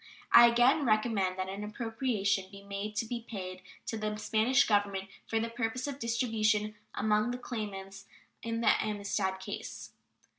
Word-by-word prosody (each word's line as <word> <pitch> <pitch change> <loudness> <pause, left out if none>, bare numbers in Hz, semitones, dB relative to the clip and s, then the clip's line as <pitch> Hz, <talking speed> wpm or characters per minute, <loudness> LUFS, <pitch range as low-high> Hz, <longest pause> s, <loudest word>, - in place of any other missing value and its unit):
I 235 0 +10
again 245 +5 +4
recommend 215 -5 +1
that 185 0 -2
an 195 +2 -5
appropriation 215 -3 -1
be 200 0 -12
made 200 +1 -5
"to 220 - 0
be 235 +1 -4
paid 185 -5 -7 0.2
to 225 - -3
the 215 0 -2
Spanish 220 +5 +3
Government 200 -2 +1 0.2
for 225 - 0
the 225 - -1
purpose 235 +1 -2
of 280 -1 -5
distribution 220 -3 +1 0.2
among 215 +2 +2
the 245 - -2
claimants 195 -5 -6 0.3
in 230 0 -2
the - - +4
Amistad 200 -2 -1
case." - - -7
215 Hz, 155 wpm, -31 LUFS, 200-230 Hz, 0.3 s, I